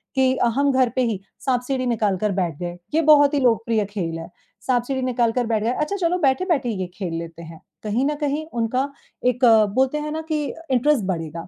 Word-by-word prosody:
कि 260 Hz, -1 st, +3 dB
अ, -, -, +1 dB
हम 280 Hz, +1 st, +3 dB
घर 260 Hz, -2 st, +3 dB
पे 255 Hz, -, +2 dB
ही 220 Hz, -5 st, -2 dB, 0.3 s
साँप-सीढ़ी 255 Hz, 0 st, 0 dB
निकाल 215 Hz, -5 st, +1 dB
कर 210 Hz, +2 st, 0 dB
बैठ 175 Hz, -6 st, -1 dB
गए, 175 Hz, 0 st, -5 dB, 0.2 s
ये 320 Hz, -, +3 dB
बहुत 290 Hz, -1 st, +7 dB
ही 290 Hz, -, +2 dB
लोकप्रिय 230 Hz, -3 st, +2 dB
खेल 180 Hz, -5 st, -4 dB
है 165 Hz, +1 st, -8 dB, 0.4 s
साँप-सीढ़ी 255 Hz, +1 st, 0 dB
निकाल 245 Hz, -2 st, +1 dB
कर 245 Hz, +1 st, 0 dB
बैठ 220 Hz, -2 st, 0 dB
गए 230 Hz, -, +1 dB
अच्छा 300 Hz, +6 st, -1 dB
चलो 360 Hz, -2 st, 0 dB
बैठे-बैठे 285 Hz, -2 st, +1 dB
ये 190 Hz, -5 st, -3 dB
खेल 185 Hz, -3 st, -5 dB
लेते 165 Hz, 0 st, -8 dB
हैं। 160 Hz, -1 st, -11 dB, 0.2 s
कहीं 220 Hz, +5 st, 0 dB
न 295 Hz, +1 st, 0 dB
कहीं 295 Hz, +2 st, -1 dB, 0.2 s
उनका 255 Hz, +5 st, 0 dB, 0.4 s
एक 250 Hz, +1 st, +2 dB, 0.3 s
बोलते 265 Hz, +3 st, +2 dB
हैं 300 Hz, -, -4 dB
ना 315 Hz, -, -3 dB
कि 305 Hz, -1 st, 0 dB, 0.3 s
इंटरेस्ट 260 Hz, -1 st, +3 dB
बढ़ेगा, 165 Hz, -2 st, -4 dB
245 Hz, 210 wpm, -22 LUFS, 205-275 Hz, 0.4 s, बहुत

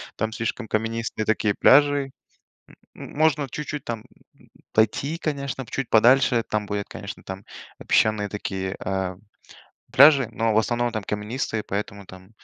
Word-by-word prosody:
там 110 Hz, +1 st, -2 dB
слишком 115 Hz, -1 st, -3 dB
каменистые 115 Hz, 0 st, -2 dB
такие 105 Hz, -1 st, +1 dB
пляжи. 145 Hz, 0 st, +4 dB, 0.8 s
М -, -, -10 dB
м -, -, -12 dB
можно 150 Hz, -2 st, +2 dB
чуть-чуть 150 Hz, 0 st, -5 dB
там, 115 Hz, -2 st, -3 dB
м, -, -, -21 dB, 0.7 s
пойти, 135 Hz, +9 st, +1 dB
конечно, 140 Hz, -4 st, -3 dB
чуть 135 Hz, -3 st, -3 dB
подальше, 120 Hz, +1 st, +4 dB
там 105 Hz, -1 st, -1 dB
будет, 100 Hz, 0 st, -3 dB
конечно, 100 Hz, -1 st, -8 dB
там 95 Hz, +1 st, -8 dB, 0.4 s
песчаные 105 Hz, -2 st, +2 dB
такие, 95 Hz, -2 st, -4 dB
э, 95 Hz, -1 st, -2 dB, 0.8 s
пляжи, 140 Hz, -2 st, +7 dB
но 115 Hz, -1 st, 0 dB
в -, -, +4 dB
основном 120 Hz, +2 st, 0 dB
там 110 Hz, -3 st, -4 dB
каменистые, 110 Hz, +1 st, -3 dB
поэтому 100 Hz, -1 st, -5 dB
там, 95 Hz, +1 st, -14 dB
110 Hz, 145 wpm, -24 LUFS, 105-135 Hz, 0.8 s, пляжи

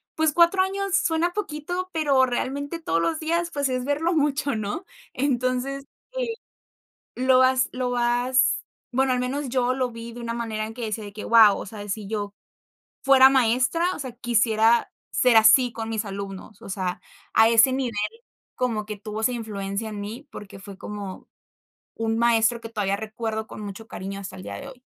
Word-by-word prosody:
pues, 315 Hz, -2 st, +2 dB
4 345 Hz, +2 st, +5 dB
años 395 Hz, 0 st, -1 dB
suena 340 Hz, +2 st, +1 dB
poquito, 360 Hz, -1 st, -4 dB
pero, 280 Hz, -5 st, +3 dB
realmente, 285 Hz, +6 st, -3 dB
todos 165 Hz, -, 0 dB
los 320 Hz, -, 0 dB
días, 335 Hz, +2 st, -1 dB
pues, 285 Hz, -3 st, -1 dB
es 255 Hz, 0 st, -2 dB
verlo 310 Hz, +5 st, 0 dB
mucho, 290 Hz, -3 st, +1 dB
¿no? 215 Hz, -, -4 dB, 0.3 s
Entonces, 260 Hz, +1 st, -1 dB, 0.3 s
eh, 485 Hz, -2 st, -1 dB, 0.8 s
lo 255 Hz, 0 st, +4 dB
vas 260 Hz, 0 st, +4 dB
lo 255 Hz, -1 st, -2 dB
vas, 245 Hz, +1 st, +2 dB, 0.3 s
bueno, 260 Hz, +1 st, +2 dB
al 250 Hz, -, +1 dB
menos 270 Hz, +2 st, -2 dB
yo 255 Hz, 0 st, +1 dB
lo 255 Hz, -2 st, -1 dB
vi 230 Hz, 0 st, -8 dB
de 240 Hz, -, -9 dB
una 230 Hz, 0 st, -3 dB
manera 220 Hz, -2 st, -3 dB
en 225 Hz, -, -9 dB
que 240 Hz, -2 st, -5 dB
decía 215 Hz, 0 st, -3 dB
de 205 Hz, -, -9 dB
que: 210 Hz, -, -8 dB
"¡Guau!, 225 Hz, -3 st, +6 dB
o -, -, -6 dB
sea, 210 Hz, +1 st, -9 dB
de 205 Hz, -, -8 dB
si 205 Hz, 0 st, -4 dB
yo 205 Hz, -2 st, -3 dB, 0.7 s
fuera 270 Hz, -1 st, +7 dB
maestra, 265 Hz, +8 st, +2 dB
o -, -, -9 dB
sea, 260 Hz, -3 st, -5 dB
quisiera 230 Hz, -1 st, +2 dB, 0.2 s
ser 250 Hz, -3 st, +3 dB
así 230 Hz, +3 st, +6 dB
con 225 Hz, -1 st, -5 dB
mis 220 Hz, -1 st, -2 dB
alumnos". 195 Hz, +1 st, -7 dB
O -, -, -9 dB
sea, 185 Hz, -2 st, -3 dB, 0.3 s
a 225 Hz, 0 st, +6 dB
ese 230 Hz, +3 st, +5 dB
nivel, 260 Hz, -3 st, -1 dB, 0.6 s
como 230 Hz, -4 st, -1 dB
que 210 Hz, -1 st, -5 dB
tuvo 215 Hz, +1 st, -6 dB
esa 250 Hz, -, +2 dB
influencia 210 Hz, -2 st, -4 dB
en 205 Hz, -1 st, -6 dB
mí, 235 Hz, +8 st, -7 dB
porque 200 Hz, -1 st, -10 dB
fue 200 Hz, -1 st, -10 dB
como 205 Hz, -2 st, -7 dB, 0.7 s
un 225 Hz, 0 st, -1 dB
maestro 235 Hz, 0 st, +3 dB
que 225 Hz, -, -7 dB
todavía 200 Hz, -3 st, -1 dB
recuerdo 220 Hz, 0 st, -4 dB
con -, -, -10 dB
mucho 205 Hz, +2 st, -8 dB
cariño 195 Hz, +1 st, -6 dB
hasta 190 Hz, -1 st, -8 dB
el 185 Hz, -, -9 dB
día -, -, -6 dB
de 275 Hz, -1 st, -8 dB
hoy. 255 Hz, -2 st, -14 dB
240 Hz, 190 wpm, -24 LUFS, 215-275 Hz, 0.8 s, fuera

